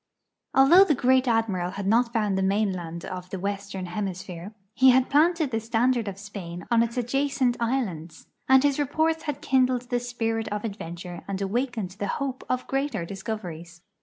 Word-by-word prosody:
Although 330 +9 +7
the 305 - +2
Great 260 +1 +3
Admiral 220 -7 +1
had 200 - -4
not 230 +4 +3
found 210 -4 0
the 190 - 0
mainland 190 -4 -1
of 180 0 -7
the 190 - -4
^Vestern 200 0 -4
Hemis 185 0 -4
phere, 180 +2 -8 0.2
he 260 +2 +6
had 255 0 +4
planted 315 0 +3
the 225 - 0
standard 230 +1 +1
of 195 -1 -5
Spain 185 -5 -8
on 235 -1 +5
its 235 +1 -1
adjacent 260 0 +1
islands, 195 -10 -3 0.2
and 265 0 +6
his 285 0 +2
reports 315 +3 0
had 295 -2 -3
kindled 255 -1 +1
the 245 - +2
spirit 225 -2 -2
of 210 0 -3
adventure 175 -4 -6
and 195 -1 -3
awakened 220 0 -2
the 200 +2 -4
hope 270 -2 -4
of 255 0 -1
greater 270 -9 -2
discoveries. 175 -4 -7
225 Hz, 175 wpm, -26 LUFS, 190-260 Hz, 0.2 s, Although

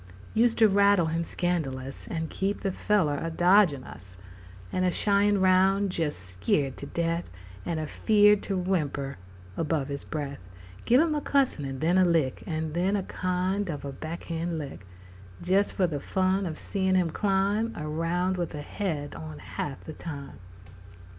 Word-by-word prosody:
Used 230 +1 +3
to 225 - +7
rattle 200 -3 +4
him 165 +1 -1
scandalous, 140 -7 -3
And 160 -2 -3
keep 195 +1 -2
the 195 - 0
feller 180 -8 +1
a 165 - -2
dodgin' 175 -4 +4
us, 90 +1 -11 0.5
And 185 - 0
a 180 - +3
shyin' 200 +2 +2
round 190 +1 +3
jes' 155 -3 -1
skeered 95 - -1
to 140 - -7
death, 170 +2 -1 0.4
And 165 -2 -1
a 155 - -2
feered 210 +4 +4
to 195 - -1
whimper 150 - -1 0.4
above 155 -3 -1
his 140 0 -4
breath; 145 -5 -5 0.5
Give 245 +2 +5
him 325 -1 +2
a 295 - -1
cussin', 270 - +1
and 135 -1 -5
then 175 +4 +3
a 180 -2 +4
kick, 155 -6 +1
And 160 -2 -2
then 185 +4 +1
a 200 - 0
kind 185 +2 -1
of 145 -3 -4
a 140 - -4
back 160 +5 -6
hand 165 0 -3
lick 135 -10 -7 0.6
Jes' 195 +3 +3
for 190 - +1
the 155 -5 -2
fun 190 +4 0
of 155 -2 -5
seein' 190 -2 0
him 175 -3 +2
climb 200 +4 +1
Around 165 +4 -1
with 170 -3 -3
a 145 - -5
head 150 -6 -3
on 80 -1 -8
half 90 - -6
the 155 - -8
time. 140 -7 -8
170 Hz, 175 wpm, -27 LUFS, 150-195 Hz, 0.6 s, to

